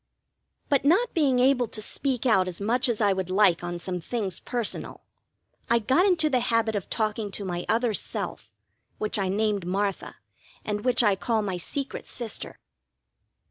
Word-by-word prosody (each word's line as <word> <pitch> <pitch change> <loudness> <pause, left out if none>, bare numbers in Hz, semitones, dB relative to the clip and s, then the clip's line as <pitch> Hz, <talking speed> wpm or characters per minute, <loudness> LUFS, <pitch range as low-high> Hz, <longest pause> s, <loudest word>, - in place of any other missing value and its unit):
But 280 -3 +2
not 370 +12 +3
being 280 -6 +3
able 250 -1 +3
to 215 - -4
speak 255 +3 -2
out 195 -6 +4
as 180 -2 -3
much 245 +6 +1
as 230 -2 0
I 205 -2 +4
would 190 -1 -3
like 185 -3 +3
on 175 0 -3
some 180 0 -4
things 200 -2 -3
personal, 240 -4 -3 0.7
I 235 - +5
got 265 - +3
into 335 -5 +3
the 260 -4 +2
habit 230 -2 +1
of 200 - -3
talking 215 -1 -1
to 200 0 -5
my 175 -1 -4
other 230 0 +2
self, - - -4 0.5
which 215 0 -1
I 190 -1 0
named 205 0 0
Martha, 195 +1 -2 0.5
and 210 0 -2
which 250 -1 +3
I 205 -3 +4
call 220 +2 0
my 190 -3 -2
secret 275 - -5
sister. 235 -4 -5
220 Hz, 175 wpm, -26 LUFS, 195-250 Hz, 0.7 s, I